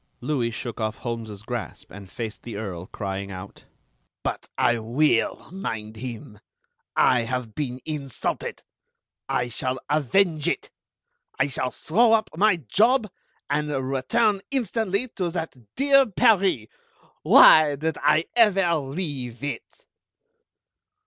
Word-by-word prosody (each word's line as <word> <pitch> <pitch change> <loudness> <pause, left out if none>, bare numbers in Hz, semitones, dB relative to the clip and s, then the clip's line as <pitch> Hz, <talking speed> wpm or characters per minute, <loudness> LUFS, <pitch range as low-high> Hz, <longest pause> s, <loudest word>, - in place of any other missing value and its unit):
Louis 125 -2 -1
shook 115 +1 -6
off 110 0 -1
Holmes's 115 -4 -6
grasp, 120 0 -6
and 100 -1 -11
faced 110 0 -6
the 115 -4 -7
Earl, 95 -4 -6
crying 100 -1 -5
out: 95 0 -10 0.6
"But - - -4
I 120 -1 +2
will 120 +3 +1
mind 110 - -5
him. 110 -3 -8 0.6
I 125 - +4
have 115 -1 -4
been 130 -2 -4
insulted. 140 -5 -4 0.7
I 125 - 0
shall 130 +2 -3
avenge 155 +2 +2
it. - - -3 0.7
I - - +2
shall 130 - -2
throw 225 - +2
up 220 -1 +2
my 205 +3 +4
job, 215 - +2 0.4
and 150 +1 -1 0.2
return 200 - +1
instantly 225 -3 0
to 185 -5 -3
that 165 -3 -4 0.2
dear 275 -1 +5
Paris! 195 - +3 0.6
Why 155 -2 +7
did 155 +1 -3
I 160 +2 +3
ever 195 -7 +4
leave 135 -4 -5
it?" 315 - -6
140 Hz, 120 wpm, -24 LUFS, 115-190 Hz, 0.7 s, Why